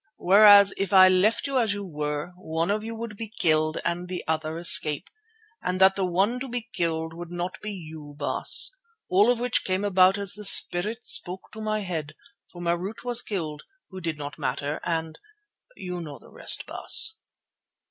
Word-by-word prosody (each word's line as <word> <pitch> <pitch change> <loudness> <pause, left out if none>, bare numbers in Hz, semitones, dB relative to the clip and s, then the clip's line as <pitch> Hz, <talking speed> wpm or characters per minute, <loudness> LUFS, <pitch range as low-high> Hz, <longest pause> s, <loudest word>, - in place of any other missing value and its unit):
Whereas 200 +1 +6
if 195 -2 -3
I 185 -1 +7
left 185 +4 +1
you 275 -2 -1
as 220 -4 0
you 205 0 -7
were, 150 0 -5
one 165 0 -3
of 210 +1 -2
you 225 +1 -7
would 225 -1 -7
be 225 -1 -7
killed 155 -1 +1
and 175 +1 -3
the 180 -1 -4
other 160 0 -3
escape, 160 -1 +3 0.5
and 185 0 -3
that 190 0 +4
the 190 -2 -2
one 195 +8 -1
to 265 0 -7
be 245 -1 -5
killed 160 -1 -3
would 170 +1 -10
not 175 +1 -6
be 210 - -6
you, 155 -6 -11
Baas. 145 - +2 0.4
All 200 +5 +3
of 245 -1 +1
which 245 0 -1
came 185 +1 -2
about 190 -1 +3
as 200 -2 -1
the 210 - -9
Spirit 210 +4 +6
spoke 185 +1 +1
in 220 0 -8
my 215 0 -2
head, 160 -6 -5 0.4
for 175 - -13
Marût 175 +5 -4
was 245 -1 +3
killed, 155 -7 -5 0.3
who 190 0 -9
did 165 -3 -4
not 145 +1 -9
matter, 140 +2 -4
and—you 180 - -8
know 150 -4 -9
the - - -19
rest, - - 0
Baas." 440 - +2
185 Hz, 185 wpm, -24 LUFS, 160-210 Hz, 0.5 s, I